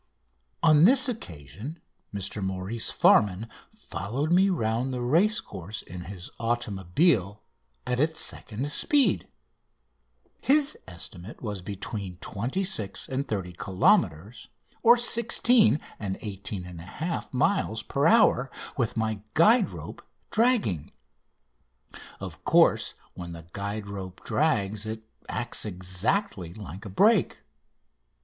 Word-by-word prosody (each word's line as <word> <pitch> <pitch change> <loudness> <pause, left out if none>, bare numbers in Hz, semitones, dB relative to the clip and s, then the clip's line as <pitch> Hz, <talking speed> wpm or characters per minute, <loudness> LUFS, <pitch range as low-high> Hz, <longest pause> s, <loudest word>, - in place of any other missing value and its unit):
On 155 -2 +6
this 255 +4 +7
occasion 105 - -7 0.3
Mr 100 0 -3
Maurice 95 +4 -2
Farman 105 +2 +3 0.2
followed 130 - -4
me 190 +3 +5
round 120 - 0
the 125 - -3
racecourse 120 - 0
in 90 0 -9
his 95 -2 -8
automobile 105 - 0 0.4
at 125 0 -1
its 160 +2 +1
second 130 0 -2
speed. 285 - +2 1.1
His 295 +1 +3
estimate 90 +4 -8
was 105 -4 -4
between 100 -1 -6
26 115 - -2
and 135 +2 -2
30 95 -4 -3
kilometres 105 - +1 0.4
(16 235 - +5 0.2
and 95 -3 -3
18 100 -2 -5
1/2 90 - -5
miles) 125 - +1
per 140 +3 +1
hour 215 - +4 0.3
with 120 -3 -1
my 110 -2 -1
guide 215 +6 +5
rope - - -9 0.3
dragging. 220 - +1 1.3
Of - - -8
course, - - +3 0.2
when 85 -1 -7
the 85 -1 -10
guide 100 +1 -4
rope 95 -2 -8
drags 110 -8 0
it 110 0 -5 0.3
acts 120 +1 -1
exactly 95 - -2
like 100 0 -9
a - - -6
brake. 205 - +3
110 Hz, 110 wpm, -27 LUFS, -, 1.3 s, this